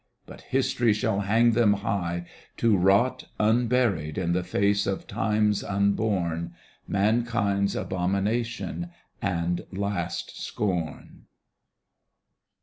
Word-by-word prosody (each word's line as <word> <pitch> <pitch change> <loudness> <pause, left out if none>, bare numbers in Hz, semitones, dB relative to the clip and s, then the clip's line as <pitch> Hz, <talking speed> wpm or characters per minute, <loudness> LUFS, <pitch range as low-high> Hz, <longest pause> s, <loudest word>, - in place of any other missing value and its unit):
But - - -12
History 120 -3 +1
shall 105 -1 0
hang 110 +4 +3
them 115 -2 +4
high, 85 -4 -2 0.3
to 115 -2 +3
rot 100 +7 +3
Unburied, 110 -8 +2
in 90 -2 0
the 90 - +1
face 100 +3 +1
of 95 -1 -2
times 105 -1 +1
unborn. 100 -4 0 0.3
Mankind's 100 -1 +1
abomination 105 - -2 0.3
and 90 -3 -1
last 100 +1 -3
scorn. 90 -6 -3
100 Hz, 95 wpm, -26 LUFS, 95-110 Hz, 0.3 s, them